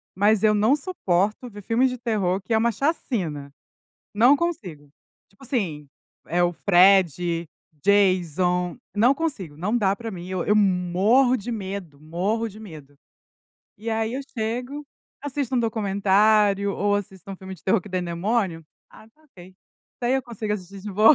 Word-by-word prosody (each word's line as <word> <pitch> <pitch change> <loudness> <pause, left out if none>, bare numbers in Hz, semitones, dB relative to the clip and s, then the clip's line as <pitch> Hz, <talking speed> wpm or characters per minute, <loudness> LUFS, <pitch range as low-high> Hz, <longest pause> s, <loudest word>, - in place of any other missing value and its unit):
Mas 210 +2 +3
eu 215 -1 +5
não 220 +7 +3
suporto 215 - -1
ver 205 -1 -11
filme 235 +6 +2
de 250 0 -4
terror 200 -5 -1
que 210 +4 -3
é - - +4
uma 235 +1 +2
chacina. 185 - -2 0.6
Não 245 +7 +6
consigo. 185 - -4 0.4
Tipo 200 +7 -20
assim, 170 - -3 0.4
eh, 175 +1 +1
o 175 - +2
Fred, 175 -3 +3 0.3
Jason, 180 -2 +2 0.2
não 240 +6 +4
consigo, 275 - -4
não 210 +9 -1
dá 195 -3 +1
para 230 +1 -6
mim, 180 -3 -8
eu 185 -2 -2
eu 210 - +3
morro 205 +7 +3
de 235 +4 -6
medo, 190 -8 -6
morro 190 +9 -2
de 210 +2 -13
medo. 155 -9 -12 0.8
E 225 +2 -7
aí 225 +1 -1
eu 275 - -3 0.2
chego, 245 +6 -3 0.4
assisto 280 -2 -3
um 245 - +2
documentário, 200 -1 +2
ou 205 0 +1
assisto 195 -1 -7
um 195 - -6
filme 190 0 -9
de 170 - -19
terror 195 +1 +2
que 205 - -12
tem 185 -1 -2
demônio. 175 -1 -1 0.3
Ah, 215 - -16
está 300 +8 -28
ok, 185 - -16 0.5
daí 245 +2 +2
eu 265 - 0
consigo 220 -3 -4
assistir 195 -1 -6
de 205 +1 -7
boa. 215 +9 +6
200 Hz, 165 wpm, -24 LUFS, 180-230 Hz, 0.8 s, Não